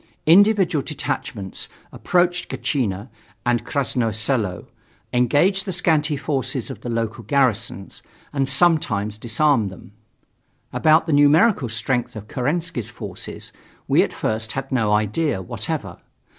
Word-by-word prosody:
Individual 190 -2 +5
detachments 110 - -4 0.2
approached 175 0 +1
Gatchina 105 - -2 0.4
and 120 -2 +1
Krasnoye 120 -5 -1
Selo, 110 -6 -1 0.5
engaged 145 - +3
the 190 - -3
scanty 155 -4 +2
forces 135 -3 -2
of - - -9
the 120 - -5
local 115 0 -2
garrisons, 115 -5 0 0.3
and 135 -2 +1
sometimes 130 - +2
disarmed 120 -1 +2
them. 95 +1 -13 0.8
About 155 +1 +4
the 160 - 0
numerical 145 - +4
strength 120 +2 -1
of 105 -1 -8
Kerensky's 140 - -2
forces - - -7 0.4
we - - +4
at - - 0
first 110 0 -2
had 135 0 -5
no 115 -5 +1
idea 105 +5 +1
whatever. 95 - -4
130 Hz, 120 wpm, -22 LUFS, 110-155 Hz, 0.8 s, Individual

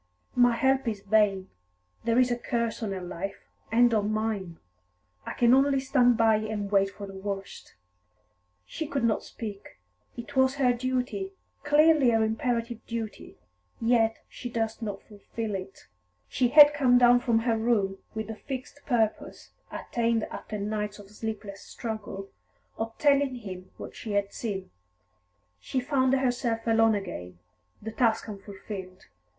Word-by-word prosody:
"My 245 -1 +5
help 265 +1 +2
is 210 -3 -2
vain. 200 -2 +2 0.6
There 230 0 +2
is 250 -1 +4
a - - +2
curse 235 -1 -2
on 215 -3 -2
her 190 -1 -4
life, 185 +3 -6 0.3
and 240 +1 +5
on 210 -1 +1
mine. 215 -6 -2 0.7
I - - -3
can 240 0 +4
only 275 +1 +4
stand 250 -3 +3
by 225 -2 +4
and 215 -2 -4
wait 195 -1 +3
for 200 +1 -9
the 195 - -10
worst." 195 0 -6 0.9
She 315 - -5
could 275 -3 -2
not 230 -2 +2
speak. 205 -3 -8 0.4
It 240 +4 -8
was 260 0 +3
her 255 -3 +3
duty, 255 +10 -2 0.3
clearly 295 -2 +5
her 225 -1 +3
imperative 230 +1 -1
duty, 225 -2 -6 0.4
yet 225 -1 +2
she 245 - -7
durst 225 -1 -2
not 205 -3 -5
fulfil 210 +1 -6
it. 195 0 -7 0.4
She 255 - +1
had 295 +3 +9
come 260 -4 +4
down 245 0 +6
from 240 -2 +1
her 225 0 +1
room 215 -4 +1 0.2
with 220 0 -3
the 220 +1 -6
fixed 265 +4 -7
purpose, 225 -5 -1 0.2
attained 230 -2 -1
after 215 - -6
nights 210 0 -3
of 205 -1 -14
sleepless 210 -2 -6
struggle, 215 -3 -6 0.5
of 225 0 -5
telling 280 -2 +3
him 185 -6 -8
what - - -9
she 215 - -6
had 200 0 0
seen. 195 -5 -4 0.9
She 260 - -2
found 260 0 +1
herself 245 -3 0
alone 225 -1 +4
again, 90 - -6 0.4
the 220 - -6
task 225 -1 +1
unfulfilled. 195 -2 -8
225 Hz, 150 wpm, -27 LUFS, 205-245 Hz, 0.9 s, had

